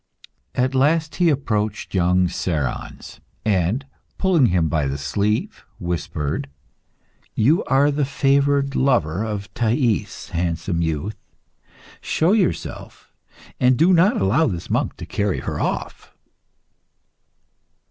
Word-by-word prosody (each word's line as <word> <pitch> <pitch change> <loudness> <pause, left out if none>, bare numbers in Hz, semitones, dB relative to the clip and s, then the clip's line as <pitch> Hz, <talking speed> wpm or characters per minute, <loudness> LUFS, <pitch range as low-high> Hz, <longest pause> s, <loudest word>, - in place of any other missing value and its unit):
At 130 +1 +1
last 150 +3 +1
he 175 -2 +4
approached 110 -7 -1
young 90 0 +3
Cerons, 80 -7 -4 0.3
and 105 +6 +1 0.3
pulling 175 -9 +3
him 85 -5 +2
by 75 -3 0
the 70 +1 -2
sleeve, 100 +10 -1 0.2
whispered 75 -4 -3 0.9
"You 145 +10 +3
are 140 +2 +3
the 145 +1 0
favoured 140 +1 +1
lover 105 - +1
of 105 -2 -5
Thais, 120 -1 0
handsome 85 0 -1
youth; 80 +6 -2 0.8
show 165 +4 +1
yourself, 205 -5 -2 0.5
and 125 0 +4
do 175 +5 +5
not 180 +4 +4
allow 105 +12 +3
this 90 -6 -4
monk - - -1
to - - -7
carry 100 -2 -1
her - - -4
off." - - -4
110 Hz, 115 wpm, -21 LUFS, 85-140 Hz, 0.9 s, do